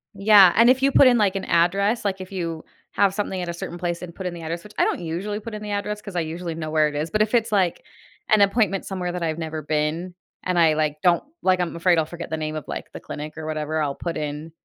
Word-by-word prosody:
Yeah, 200 Hz, -2 st, +7 dB
and 230 Hz, +2 st, +6 dB
if 260 Hz, +1 st, +4 dB
you 275 Hz, -, +3 dB
put 270 Hz, -, +7 dB
in 245 Hz, -1 st, +5 dB
like 200 Hz, -2 st, +2 dB
an 195 Hz, -, -3 dB
address, 200 Hz, +7 st, +2 dB
like 195 Hz, -1 st, -1 dB
if 185 Hz, +1 st, -9 dB
you 165 Hz, -4 st, -4 dB, 0.3 s
have 200 Hz, -2 st, +2 dB
something 195 Hz, -2 st, -3 dB
at 175 Hz, -, -4 dB
a -, -, -2 dB
certain 175 Hz, 0 st, -6 dB
place 175 Hz, -1 st, -3 dB
and 175 Hz, -2 st, -8 dB
put 190 Hz, -, -8 dB
in 180 Hz, -, -2 dB
the 170 Hz, -, -8 dB
address, 165 Hz, +1 st, -5 dB
which 210 Hz, -, -13 dB
I -, -, +4 dB
don't -, -, 0 dB
usually 180 Hz, +6 st, -4 dB
put 220 Hz, +1 st, -8 dB
in 210 Hz, -, -6 dB
the 210 Hz, -1 st, -5 dB
address, 205 Hz, +1 st, -3 dB
'cause 200 Hz, -3 st, -9 dB
I 175 Hz, -, +1 dB
usually 165 Hz, +1 st, -5 dB
know 155 Hz, -1 st, -5 dB
where 155 Hz, -1 st, +3 dB
it 150 Hz, -, -6 dB
is, 155 Hz, +3 st, -2 dB
but 215 Hz, 0 st, +1 dB
if 215 Hz, +1 st, +1 dB
it's 230 Hz, -1 st, +1 dB
like 190 Hz, -5 st, +1 dB, 0.5 s
an 215 Hz, -2 st, +5 dB
appointment 200 Hz, -1 st, +2 dB
somewhere 180 Hz, -2 st, -3 dB
that 180 Hz, -1 st, -4 dB
I've 160 Hz, -1 st, -1 dB
never 160 Hz, -1 st, -4 dB
been, 155 Hz, +4 st, -2 dB, 0.3 s
and 180 Hz, -1 st, -1 dB
I 165 Hz, -2 st, +5 dB
like 155 Hz, -1 st, 0 dB
don't 175 Hz, -1 st, +4 dB, 0.2 s
like, 185 Hz, -1 st, +3 dB
I'm 175 Hz, -2 st, -2 dB
afraid 170 Hz, +1 st, +3 dB
I'll 155 Hz, -, +1 dB
forget 170 Hz, +1 st, -8 dB
the 160 Hz, -, -2 dB
name 155 Hz, 0 st, -3 dB
of 155 Hz, -, -4 dB
like -, -, -6 dB
the -, -, -8 dB
clinic 150 Hz, +1 st, -8 dB
or 160 Hz, -, -6 dB
whatever, 155 Hz, 0 st, -2 dB
I'll 140 Hz, -2 st, -1 dB
put 170 Hz, -1 st, -4 dB
in 150 Hz, +1 st, -5 dB
175 Hz, 285 wpm, -23 LUFS, 160-200 Hz, 0.5 s, Yeah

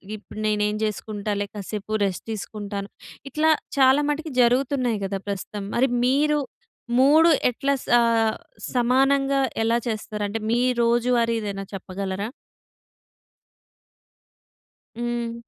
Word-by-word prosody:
ఇప్పుడు 215 Hz, 0 st, -11 dB
నేనేం 210 Hz, 0 st, +1 dB
జేసుకుంటాలే 210 Hz, -1 st, -2 dB
కాసేపు 205 Hz, +1 st, -6 dB
రెస్ట్ 190 Hz, -2 st, -3 dB
తీసుకుంటాను. 205 Hz, -1 st, -5 dB, 0.4 s
ఇట్లా 305 Hz, +4 st, +2 dB, 0.3 s
చాలా 265 Hz, +1 st, +5 dB
మటికి 310 Hz, +2 st, -2 dB
జరుగుతున్నాయి 250 Hz, -1 st, +2 dB
గదా 195 Hz, 0 st, -2 dB
ప్రస్తుతం. 200 Hz, +1 st, -4 dB
మరి 260 Hz, +3 st, +3 dB, 0.2 s
మీరు 295 Hz, +3 st, +3 dB, 0.6 s
3 305 Hz, +5 st, +6 dB, 0.2 s
ఎట్లా 275 Hz, +3 st, 0 dB
సా 240 Hz, -, +5 dB, 0.7 s
సమానంగా 270 Hz, +3 st, +3 dB, 0.2 s
ఎలా 230 Hz, +1 st, +2 dB
చేస్తారంటే, 215 Hz, -1 st, -3 dB
మీ 235 Hz, +1 st, +2 dB, 0.2 s
రోజువారీ 235 Hz, 0 st, +2 dB
ఏదైనా 200 Hz, -2 st, -4 dB
చెప్పగలరా? 195 Hz, +1 st, -4 dB, 2.7 s
హ్మ్. 240 Hz, -1 st, -2 dB
230 Hz, 95 wpm, -24 LUFS, 205-265 Hz, 2.7 s, 3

